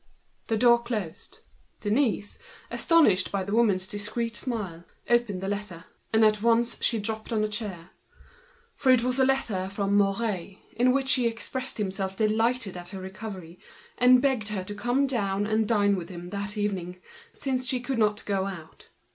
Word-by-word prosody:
The 225 - +1
door 235 +1 +5
closed. 215 -9 -5 0.4
Denise, 210 -1 0 0.3
astonished 315 - +3
by 195 -1 -1
this 200 +2 -4
woman's 205 -5 +3
discreet 220 +4 -3
smile, 210 -8 -3 0.2
opened 240 -6 +1
the 195 - -3
letter. 200 -4 -4 0.9
She 230 - +3
dropped 220 +1 -4
on 220 -2 +1
to - - +2
a - - 0
chair; 205 -5 -5 0.9
it 255 -3 +5
was 250 +1 +1
a 265 - +5
letter 215 -8 0
from 200 0 -1
Mouret, 200 -2 0 0.2
in 245 +2 +4
which 265 0 +2
he 245 -2 +3
expressed 255 +3 -4
himself 195 -2 -3
delighted 225 -1 +1
at 175 -1 -8
her 190 0 -7
recovery, 190 -2 -8 0.4
and 250 +1 +5
begged 260 -7 +1
her 205 -3 -3
to 205 - -7
go 245 +6 +1
down 205 -6 -1
and 215 0 +1
dine 205 -3 +3
with 175 -3 -6
him 175 -1 -8
that 200 +1 -4
evening, 185 -3 -2 0.5
as 255 -1 0
she 255 - 0
could 250 0 -3
not 210 -1 +1
go 195 -1 0
out. 170 -5 -10
210 Hz, 165 wpm, -27 LUFS, 195-235 Hz, 0.9 s, door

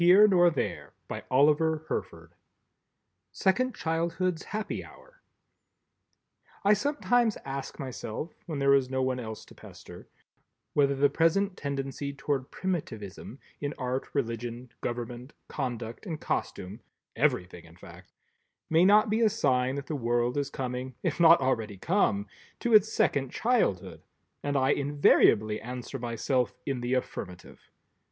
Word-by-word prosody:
Allah 145 +4 +5 0.3
forbid! 90 - -5 1.0
SECOND 255 +7 +1
CHILDHOOD'S 165 +1 -1
HAPPY 215 0 -4
HOUR - - -17 1.4
I 205 - +7
sometimes 245 -2 +1
ask 135 0 -5
myself 130 +3 -6
(when 155 -4 -3
there 140 0 +4
is 135 -2 +3
no 130 0 0
one 130 -1 0
else 110 -2 -7
to - - -16
pester) - - -13 0.7
whether 140 -1 +3
the 140 +1 +4
present 180 +5 +2
tendency 140 0 -4
toward 135 -1 -2
Primitivism, 115 - -5 0.2
in 145 0 -3
Art, 130 0 -3
Religion, 120 -1 -3
Government, 120 +2 -5
Conduct 120 - -5
and 160 -4 -4
Costume 95 +5 -3 0.4
(everything 90 -1 0
in 85 0 -16
fact) 90 - -14 0.6
may 165 +2 +5
not 210 +3 +6
be 215 +2 +1
a 225 - +5
sign 130 - +1
that 140 -1 -5
the 155 - -4
world 120 -1 0
is 145 -1 -1
coming, 125 0 -4
if - - -1
not 165 0 +8
already 115 -6 -1
come, 105 - +1 0.4
to 240 - 0
its 215 +1 +6
second 135 - +1
childhood, 220 - 0 0.4
and 145 0 -1
I 135 +1 +3
invariably 135 -7 +3
answer 125 +3 -6
myself 120 +1 -1
in 135 -3 -2
the 120 +2 0
affirmative. 90 -7 -6
135 Hz, 130 wpm, -28 LUFS, 120-165 Hz, 1.4 s, not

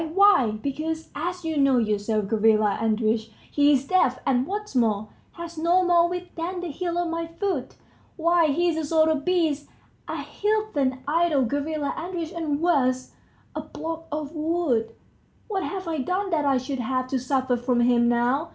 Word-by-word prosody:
Why, 330 - +4
because, 315 +3 -3
as 350 +3 -4
you 320 -1 -1
know 275 -2 +4
yourself, 215 -1 0
Gavrila 215 0 +2
Andreitch, 220 0 0 0.2
he's 285 -2 +3
deaf, 275 -7 +2
and 260 0 +1
what's 415 0 -4
more, 215 -4 +1 0.2
has 340 -1 -8
no 350 +3 +3
more 345 -1 +4
wit 360 0 -6
than 350 +2 -3
the 350 -3 -4
heel 345 +3 -3
of 350 0 0
my 330 0 -3
foot. 335 -5 -3 0.4
Why, 335 0 +3
he's 330 +3 +1
a - - -2
sort 315 +1 +3
of 290 -2 -2
beast, 320 -5 +1 0.4
a - - -4
heathen 400 -12 -1
idol, 310 -3 +2
Gavrila 285 +3 -2
Andreitch, 340 -1 -4
and 320 -5 -2
worse... 255 -7 +1 0.4
a - - -2
block 330 0 -6
of 300 -1 -3
wood; 305 -8 0 0.6
what 390 -3 -2
have 375 -1 -4
I 320 -2 -2
done 370 +8 -1
that 305 -3 +1
I 275 -2 +3
should 260 +1 -4
have 255 +2 -1
to 265 - 0
suffer 260 0 0
from 245 0 +1
him 240 0 +4
now? 245 +7 +1
305 Hz, 170 wpm, -25 LUFS, 255-340 Hz, 0.6 s, Why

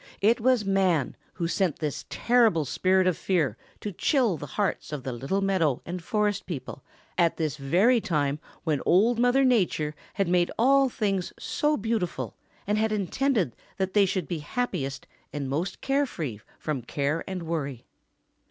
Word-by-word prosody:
It 225 +4 +3
was 250 -3 +3
man 185 -8 +2 0.2
who 175 - -4
had 165 - 0
sent 185 -7 +1
this 150 -3 -3
terrible 230 -10 +3
Spirit 185 +7 +2
of 185 -2 +2
Fear 155 - 0 0.3
to 210 - -3
chill 235 - +2
the 145 -1 -7
hearts 200 +4 -2
of 145 -4 -4
the 130 - -3
little 135 +12 -1
meadow 180 -9 +2
and 175 0 -5
forest 210 0 0
people 135 -6 -6 0.4
at 170 -1 +3
this 155 -4 -1
very 185 - +3
time 145 -5 0 0.2
when 155 -5 0
Old 225 +7 +4
Mother 245 +3 +4
Nature 185 - +2 0.2
had 195 -2 +1
made 175 0 +3
all 270 +3 +5
things 195 -6 -1
so 300 -1 0
beautiful 220 -4 -2 0.3
and 210 +1 +1
had 220 0 +1
intended 210 - 0 0.2
that 190 -1 -1
they 205 -2 +5
should 185 -3 -2
be 170 -3 -3
happiest 145 - -3 0.3
and 145 -2 -3
most 155 +8 -3
free 195 - -1 0.2
from 150 -4 -3
care 140 +6 -1
and 185 -3 -4
worry. 140 -7 -3
185 Hz, 165 wpm, -27 LUFS, 150-215 Hz, 0.4 s, all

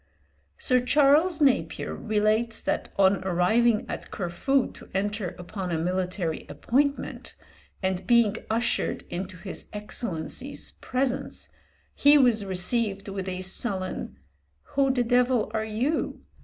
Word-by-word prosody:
Sir 255 -2 +3
Charles 295 +6 +4
Napier 275 -3 +2
relates 220 +2 +1
that - - -2
on 195 -1 +4
arriving 210 +6 +3
at - - -6
Corfu 230 +9 0
to - - -14
enter 200 -2 -1
upon 180 +1 -5
a 165 - 0
military 180 0 -2
appointment, 280 +3 -1 0.5
and 190 0 -1
being 235 -3 +4
ushered 230 +2 0
into 185 +1 -5
his 190 +2 -7
Excellency's 210 - -5
presence, 255 0 -2 0.4
he 290 +1 +6
was 240 -6 +4
received 195 +2 0
with 195 -1 -4
a 185 0 -4
sullen 190 0 -4 0.6
"Who 275 -1 +3
the 250 -2 +1
devil 245 -2 +2
are 220 -1 0
you?" 240 +9 -1
215 Hz, 120 wpm, -26 LUFS, 190-250 Hz, 0.6 s, he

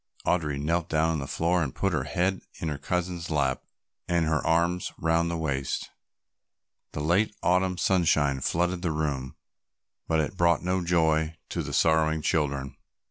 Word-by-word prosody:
Audry 75 -5 0
knelt 85 +3 0
down 80 +1 +2
on 80 - -1
the 70 - -5
floor 85 +4 +1
and 70 -4 -3
put 95 -2 0
her 70 -5 0
head 90 +3 0 0.2
in 80 - -2
her 75 -2 -4
cousin's 90 -1 -2
lap, 70 -4 0 0.5
and 85 -2 +2
her 80 -1 0
arms 85 +2 +1
round 85 +1 +1
her 85 - -2
waist. 70 -4 -2 1.0
The 75 - -3
late 95 +7 +2
Autumn 90 0 +2
sunshine 75 -8 +2
flooded 85 +5 0
the 90 -3 0
room, 70 -4 -2 0.7
but 80 - +2
it 80 +4 -1
brought 85 -2 +3
no 90 0 0
joy 80 -2 +1
to - - -2
the - - -5
sorrowing 80 -1 +2
children. 70 -4 -1
80 Hz, 165 wpm, -27 LUFS, 75-90 Hz, 1.0 s, brought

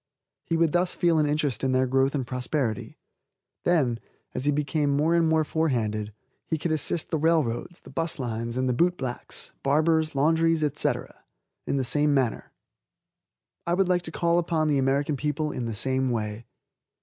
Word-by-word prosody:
He 165 - 0
would 165 -2 +3
thus 175 +2 +1
feel 170 -2 +2
an 150 - +2
interest 145 -5 -1
in 130 -1 +1
their 130 0 +3
growth 135 +2 +1
and 135 -3 -1
prosperity. 125 -2 -3 0.7
Then, 135 -10 +2 0.3
as 130 - -3
he 145 - +3
became 145 +1 0
more 150 +4 +2
and 165 -1 +3
more 160 0 +3
forehanded, 115 -10 -1 0.4
he 160 - 0
could 160 +2 -2
assist 155 +1 -1
the 160 - 0
railroads, 160 -1 0
the - - -14
'bus 165 0 0
lines, 115 -2 -3
and 130 0 0
the 125 - +1
boot 175 +7 +2
blacks, 125 -2 -3
barbers, 155 +2 +2
laundries, 165 +3 +2
&c., - - +2 0.8
in 140 - 0
the 135 - +1
same 145 +3 +3
manner. 130 -4 -1 1.2
I 170 - +2
would 190 0 +1
like 180 -1 +2
to 165 - -5
call 170 +1 +2
upon 165 -2 0
the 145 -2 +2
American 140 +2 +1
people 150 +2 -1
in 125 - -4
the 115 -2 -3
same 130 +3 0
way. 110 -1 -3
145 Hz, 180 wpm, -26 LUFS, 130-160 Hz, 1.2 s, would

